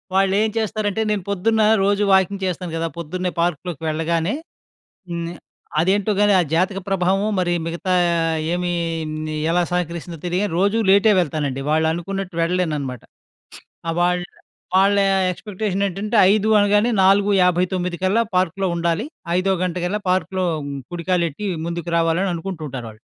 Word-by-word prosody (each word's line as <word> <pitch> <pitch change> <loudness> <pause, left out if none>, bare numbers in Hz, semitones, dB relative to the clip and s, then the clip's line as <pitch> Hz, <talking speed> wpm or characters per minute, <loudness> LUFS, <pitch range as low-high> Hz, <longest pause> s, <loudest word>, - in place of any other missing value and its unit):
వాళ్ళు 195 0 +3
ఏం 220 - +2
చేస్తారంటే, 215 -1 -1
నేను 200 -4 -1
పొద్దున్న 220 +3 +1 0.2
రోజు 200 +1 +2
వాకింగ్ 190 +1 +2
చేస్తాను 180 -1 -3
కదా, 165 0 -1
పొద్దున్నే 180 +2 -3
పార్క్‌లోకి 170 -2 -2
వెళ్ళగానే. 165 +3 0 0.8
హ్మ్, 170 0 -4 0.5
అదేంటో 195 +4 +2
గాని 205 0 +4
ఆ - - +5
జాతక 190 +3 +1
ప్రభావమో, 195 +2 +1
మరి 175 -1 +1
మిగతా 170 +2 -2 0.6
ఏమి 180 0 -1 0.8
ఎలా 175 +1 +2
సహకరిస్తుందో 170 -1 -3
తెలియని 185 +3 -1
రోజు 200 +3 +2
లేటే 200 +3 +6
వెళ్తానండి. 145 -5 -1
వాళ్ళు 160 +1 +2
అనుకున్నట్టు 190 +1 -5
వెళ్ళలేను 175 -2 0
అన్నమాట. 130 -4 -6 1.0
వాళ్ళ 180 0 +2 0.5
వాళ్ళ 195 +2 +4 0.3
ఎక్స్‌పెక్టె‌ష‌న్ 200 0 -3
ఏంటంటే 200 +4 -4 0.2
ఐదు 215 0 +1
అనగానే 205 +3 +3
4:59 185 -2 +2
కల్లా 200 +5 +3
పార్క్‌లో 185 +1 +1
ఉండాలి. 170 +6 0 0.3
5:00 195 +1 +1
గంట 180 -1 -2
కల్లా 210 +4 -1
పార్క్‌లో 185 0 0 0.5
కుడికాలెట్టి 175 +1 -1 0.2
ముందుకు 170 0 -4
రావాలని 165 +3 +1
అనుకుంటూ 170 -1 -6
ఉంటారు 125 -3 -6
వాళ్ళు. 110 +1 -15
185 Hz, 130 wpm, -21 LUFS, 170-195 Hz, 1.0 s, లేటే